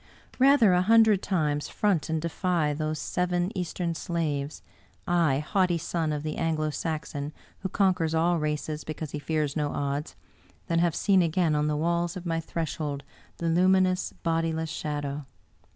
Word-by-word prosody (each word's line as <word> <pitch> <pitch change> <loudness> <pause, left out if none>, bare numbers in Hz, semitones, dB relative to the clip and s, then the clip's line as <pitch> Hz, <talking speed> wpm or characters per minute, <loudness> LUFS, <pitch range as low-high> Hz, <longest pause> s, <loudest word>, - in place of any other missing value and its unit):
Rather, 260 -7 +6
a 180 - +4
hundred 220 0 +5
times, 150 -6 0
front 195 -8 0
and 160 0 0
defy 170 -2 0
those 155 +1 -2
seven 180 +4 -1
Eastern 175 -1 -2
slaves 155 -4 -3 0.3
— - - -35 0.2
I, 135 -2 +2
haughty 175 +3 +1
son 160 -1 -2
of 150 -1 -3
the 155 -1 -3
Anglo 155 -2 0
Saxon 150 -2 -4 0.3
who 190 - -3
conquers 180 -5 +1
all 170 +1 +2
races 150 0 -2
because 155 -1 -6
he 150 - -4
fears 150 -1 -1
no 150 -2 0
odds 145 +2 -3 0.3
— - - -32
^than 165 - +3
have 170 -2 +2
seen 195 -3 +4
again 170 -1 +2
on 150 0 +1
the 150 -1 0
walls 170 +2 0
of 180 - -8
my 165 -1 0
threshold 155 -3 -3 0.3
the 170 - -4
luminous, 185 +2 +3
bodi 165 -1 +1
less 160 0 -3
shadow! 145 -2 -4
165 Hz, 170 wpm, -27 LUFS, 150-180 Hz, 0.3 s, Rather